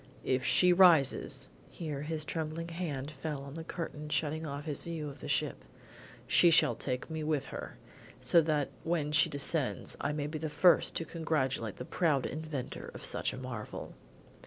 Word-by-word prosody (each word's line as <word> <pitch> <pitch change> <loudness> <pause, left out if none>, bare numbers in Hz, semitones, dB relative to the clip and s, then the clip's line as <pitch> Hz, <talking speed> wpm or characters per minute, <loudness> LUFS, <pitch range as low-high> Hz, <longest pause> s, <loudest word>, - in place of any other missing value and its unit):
If 130 0 +1
she 180 +7 +5
rises 175 -7 +4
" - - -26
here 150 -5 -5
his 155 0 -2
trembling 160 +1 -3
hand 155 -5 -4
fell 150 -3 -5
on 140 0 -9
the 165 +1 -6
curtain 155 -3 -6
shutting 155 +1 -1
off 145 0 -5
his 150 -3 +1
view 165 -3 -5
of 140 0 -11
the - - -7
ship, - - -1 0.6
"she 175 - +6
shall 165 - +5
take 130 +3 -4
me 160 -1 -3
with 150 -3 0
her, - - -7 0.4
so 125 +7 +5
that 150 -3 0
when 160 -3 0
she 155 +2 +5
descends 145 -1 -1
I 145 - 0
may 150 -1 -2
be 155 +1 -4
the 155 0 -3
first 150 +4 +4
to 165 - -1
congratulate 135 - -1
the 125 - -7
proud 150 -6 +1
inventor 155 -4 -5
of - - -5
such - - 0
a - - -7
marvel." 125 -5 -6
150 Hz, 185 wpm, -32 LUFS, 140-165 Hz, 0.6 s, she